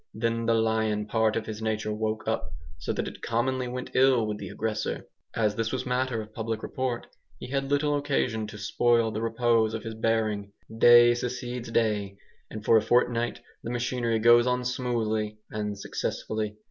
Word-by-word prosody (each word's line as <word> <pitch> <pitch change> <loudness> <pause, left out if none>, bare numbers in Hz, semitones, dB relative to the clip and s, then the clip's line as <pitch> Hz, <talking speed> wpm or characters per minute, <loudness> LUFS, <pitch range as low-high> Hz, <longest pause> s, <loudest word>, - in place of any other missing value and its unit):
Then 115 0 -1
the 115 - +4
lion 110 -1 +1
part 110 0 +1
of 115 - -2
his 110 -1 -6
nature 110 -1 -1
woke 110 0 -2
up, 110 -8 -1 0.3
so - - -2
that - - -2
it - - -9
commonly 125 +2 0
went 125 +1 -5
ill 130 -3 +4
with 105 -1 -3
the - - -6
aggressor. 110 0 -3 0.3
As 105 -2 +2
this 115 +1 -2
was 130 - -2
matter 125 -2 -1
of 110 0 -16
public 110 -1 -3
report, 130 -2 -3 0.3
he 125 - -9
had 135 0 -1
little 145 +1 +2
occasion 130 -6 0
to 105 0 -9
spoil 115 +2 +2
the 110 - -3
repose 115 -1 +2
of 110 - -5
his 115 -1 -5
bearing. 110 -2 -1 0.2
Day 120 +1 +7
succeeds 125 0 -4
day, 105 -4 0 0.3
and 110 -1 -8
for 115 - +6
a - - +4
fortnight 120 +1 +1 0.2
the - - -6
machinery 120 -1 0
goes 120 +2 +6
on 125 0 0
smoothly 110 -4 -1
and 105 -1 -3
successfully. 105 +1 -3
115 Hz, 180 wpm, -27 LUFS, 110-120 Hz, 0.3 s, Day